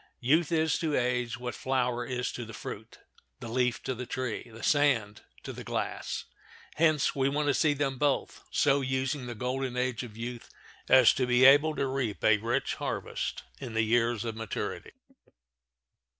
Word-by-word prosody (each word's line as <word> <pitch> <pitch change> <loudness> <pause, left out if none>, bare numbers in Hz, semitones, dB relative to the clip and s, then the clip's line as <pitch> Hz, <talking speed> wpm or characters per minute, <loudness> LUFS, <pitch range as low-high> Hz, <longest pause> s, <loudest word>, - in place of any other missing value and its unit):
Youth 150 +6 +2
is 160 -2 +2
to 155 -3 0
age 125 -1 0
what 125 -1 -5
the - - -11
flower 125 -2 0
is 125 -1 -2
to 120 - -6
the 115 -1 -9
fruit, - - -8 0.4
the 120 - -7
leaf 125 +1 0
to 130 - -2
the 125 0 -6
tree, 125 -2 -4
the 115 +1 -11
sand 130 -9 +2 0.2
to - - -6
the - - -8
glass. - - -3 0.5
Hence 155 -2 +3
we 135 0 +2
want 145 +1 0
to - - +4
see 145 +4 +3
them 135 -2 -1
both 145 -2 0
so 140 +1 +3
using 130 0 -2
the 120 - -5
golden 125 +2 -3
age 125 -2 -1
of 115 -4 -9
youth 120 +1 -6 0.4
as 130 -3 +7
to 130 -1 0
be 125 +1 +5
able 145 +3 +6
to - - 0
reap 130 -6 -2
a 110 -1 +5
rich 120 +5 -1
harvest - - -4 0.2
in 115 -3 -7
the 115 - +3
years 115 0 +1
of 115 -1 -3
maturity. 110 -2 -5
125 Hz, 180 wpm, -29 LUFS, 120-135 Hz, 0.5 s, as